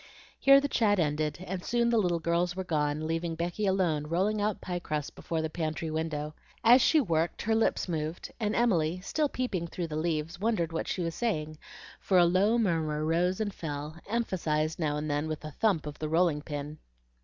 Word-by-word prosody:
Here 275 Hz, 0 st, +7 dB
the 285 Hz, -, -1 dB
chat 215 Hz, -6 st, +2 dB
ended, 155 Hz, +1 st, -1 dB
and 185 Hz, -1 st, -4 dB
soon 235 Hz, 0 st, +1 dB
the 230 Hz, -, +4 dB
little 175 Hz, -4 st, +1 dB
girls 170 Hz, +2 st, 0 dB
were 190 Hz, -, -3 dB
gone, 150 Hz, -2 st, -1 dB
leaving 165 Hz, +1 st, -2 dB
Becky 175 Hz, +5 st, -2 dB
alone 170 Hz, -6 st, +1 dB
rolling 195 Hz, +6 st, +1 dB
out 210 Hz, -1 st, 0 dB
pie 180 Hz, -1 st, -4 dB
crust 150 Hz, -4 st, -4 dB
before 160 Hz, -1 st, -3 dB
the -, -, 0 dB
pantry 160 Hz, -1 st, -3 dB
window. 155 Hz, -1 st, -3 dB, 0.3 s
As 245 Hz, +3 st, +7 dB
she 315 Hz, -, +5 dB
worked 170 Hz, -, 0 dB
her 225 Hz, -, +1 dB
lips 220 Hz, -2 st, +1 dB
moved, 160 Hz, -1 st, -3 dB
and 215 Hz, -2 st, 0 dB
Emily, 180 Hz, -8 st, +2 dB
still 295 Hz, +9 st, 0 dB
peeping 200 Hz, -11 st, -2 dB
through 170 Hz, 0 st, -4 dB
the 150 Hz, -, -4 dB
leaves, 160 Hz, +1 st, -2 dB
wondered 195 Hz, -6 st, 0 dB
what 165 Hz, -, -2 dB
she 185 Hz, -, -2 dB
was 165 Hz, -1 st, -2 dB
saying, 155 Hz, -10 st, -2 dB, 0.4 s
for 190 Hz, -, +2 dB
a 175 Hz, -, +7 dB
low 195 Hz, +7 st, +3 dB
murmur 160 Hz, -8 st, 0 dB
rose 175 Hz, +4 st, +1 dB
and 210 Hz, -2 st, -2 dB
fell, 150 Hz, -2 st, -5 dB
emphasized 165 Hz, -9 st, -1 dB
now 150 Hz, -3 st, 0 dB
and 150 Hz, +1 st, -3 dB
then 145 Hz, +1 st, -1 dB
with 155 Hz, 0 st, -5 dB
a 155 Hz, -, -6 dB
thump 190 Hz, -2 st, +1 dB
of 150 Hz, -1 st, -7 dB
the 155 Hz, -, -3 dB
rolling 165 Hz, -2 st, +2 dB
pin. 150 Hz, 0 st, -6 dB
170 Hz, 200 wpm, -29 LUFS, 155-195 Hz, 0.4 s, Here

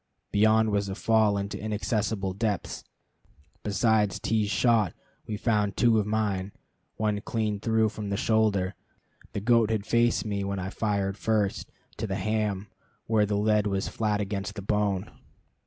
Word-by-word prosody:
Beyond 110 Hz, +1 st, +4 dB
was 100 Hz, -1 st, 0 dB
a 95 Hz, -, -3 dB
fall 110 Hz, -2 st, +3 dB
into 100 Hz, 0 st, -4 dB
inaccessible 105 Hz, -2 st, -1 dB
depths. 105 Hz, -1 st, -2 dB, 0.8 s
Besides 105 Hz, 0 st, +1 dB
T 110 Hz, -1 st, +1 dB
's -, -, -4 dB
shot 110 Hz, -4 st, +2 dB, 0.3 s
we 105 Hz, -, -3 dB
found 105 Hz, -3 st, 0 dB
two 115 Hz, -2 st, +4 dB
of 105 Hz, -, -1 dB
mine 105 Hz, -3 st, -1 dB, 0.4 s
one 105 Hz, -1 st, 0 dB
clean 110 Hz, -5 st, -2 dB
through 110 Hz, 0 st, +2 dB
from 105 Hz, -1 st, -6 dB
the 100 Hz, -, -1 dB
shoulder 105 Hz, -4 st, +2 dB, 0.6 s
the 100 Hz, -, -3 dB
goat 115 Hz, 0 st, +4 dB
had 110 Hz, -2 st, -1 dB
faced 120 Hz, 0 st, +2 dB
me 100 Hz, -2 st, -2 dB
when 100 Hz, 0 st, -2 dB
I 95 Hz, +1 st, -4 dB
fired 100 Hz, -3 st, -1 dB
first 105 Hz, -3 st, 0 dB, 0.3 s
to 110 Hz, -, -3 dB
the 95 Hz, -, -2 dB
ham, 105 Hz, 0 st, -1 dB, 0.4 s
where 110 Hz, -2 st, +2 dB
the 105 Hz, 0 st, 0 dB
lead 105 Hz, 0 st, +2 dB
was 100 Hz, -1 st, -1 dB
flat 105 Hz, -2 st, 0 dB
against 100 Hz, 0 st, -3 dB
the 100 Hz, -, -6 dB
bone. 100 Hz, -2 st, 0 dB
105 Hz, 160 wpm, -27 LUFS, 100-110 Hz, 0.8 s, Beyond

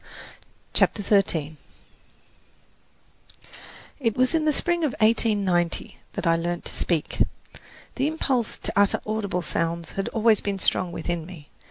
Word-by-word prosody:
CHAPTER 205 Hz, -, +2 dB
XIII 160 Hz, -7 st, +1 dB, 2.4 s
It 230 Hz, -6 st, 0 dB
was 255 Hz, +3 st, +3 dB
in 320 Hz, -1 st, +1 dB
the 305 Hz, -, +4 dB
spring 345 Hz, +3 st, +1 dB
of 290 Hz, -6 st, +1 dB
1890 205 Hz, -6 st, +1 dB, 0.2 s
that -, -, -4 dB
I 165 Hz, 0 st, +4 dB
learned 175 Hz, +1 st, -3 dB
to -, -, -4 dB
speak. 165 Hz, -4 st, -1 dB, 0.8 s
The 265 Hz, +2 st, +2 dB
impulse 265 Hz, -7 st, -1 dB
to -, -, -3 dB
utter 200 Hz, 0 st, +3 dB
audible 205 Hz, -4 st, -2 dB
sounds 165 Hz, 0 st, -2 dB
had 195 Hz, -, -3 dB
always 225 Hz, -1 st, +3 dB
been 200 Hz, -1 st, -2 dB
strong 185 Hz, -1 st, 0 dB
within 170 Hz, -1 st, -3 dB
me. 165 Hz, -6 st, -12 dB
200 Hz, 135 wpm, -25 LUFS, 170-230 Hz, 2.4 s, the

